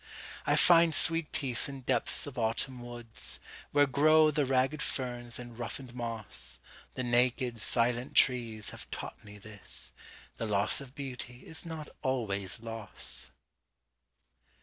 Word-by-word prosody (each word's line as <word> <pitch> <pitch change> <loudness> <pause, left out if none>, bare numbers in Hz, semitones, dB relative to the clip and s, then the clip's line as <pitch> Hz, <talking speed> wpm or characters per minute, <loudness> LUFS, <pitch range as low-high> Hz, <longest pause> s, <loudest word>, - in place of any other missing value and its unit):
I - - +4
find 170 -2 +7
sweet 165 -1 +3
peace 135 -2 +1
in 135 -1 -7
depths 125 -2 +1
of 145 -3 -8
autumn 120 +2 -1
woods, 120 -2 -1 0.3
Where 145 0 +5
grow 155 +3 +5
the 145 -2 +1
ragged 135 +3 +2
ferns 120 -4 -3
and 120 -1 -9
roughened 120 +1 -5
moss; 110 - -3 0.4
The 130 - -2
naked, 120 0 +1
silent 120 +4 +1
trees 115 -4 +3
have - - -10
taught - - -7
me 105 0 -11
this,—The 105 +2 -8
loss 105 +5 +3
of 135 -1 -11
beauty 125 -3 -6
is 160 +1 -5
not 160 -2 -6
always 105 -7 -1
loss! 115 -2 -7
125 Hz, 130 wpm, -31 LUFS, 115-135 Hz, 0.4 s, find